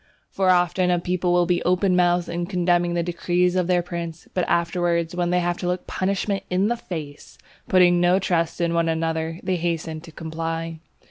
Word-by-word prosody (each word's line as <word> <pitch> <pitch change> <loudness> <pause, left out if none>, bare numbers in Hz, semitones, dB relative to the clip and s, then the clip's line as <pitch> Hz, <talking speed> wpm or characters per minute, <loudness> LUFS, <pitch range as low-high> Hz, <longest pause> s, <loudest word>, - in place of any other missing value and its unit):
For 190 -1 +1
often 180 0 +3
a 175 - +3
people 180 +1 -1
will 175 0 +3
be 175 0 +1
open 185 +1 +2
mouthed 175 -1 +2
in 175 0 -3
condemning 175 -2 +1
the 170 - +1
decrees 175 +1 0
of 180 -2 +1
their 180 -1 +2
prince, 170 -2 -6
but 180 -2 0
afterwards, 170 -1 0
when 175 -1 0
they 180 0 +2
have 175 0 -1
to 180 - -3
look 180 0 -2
punishment 195 +1 -1
in 185 +3 +1
the 240 - +1
face, 155 -10 -8 0.3
putting 175 -1 +5
no 175 +1 +4
trust 170 -3 0
in 170 -1 0
one 170 -1 +1
another, 160 0 -2
they 185 -1 0
hasten 165 -2 -3
to 165 0 -13
comply. 165 +1 -4
175 Hz, 195 wpm, -23 LUFS, 170-180 Hz, 0.3 s, putting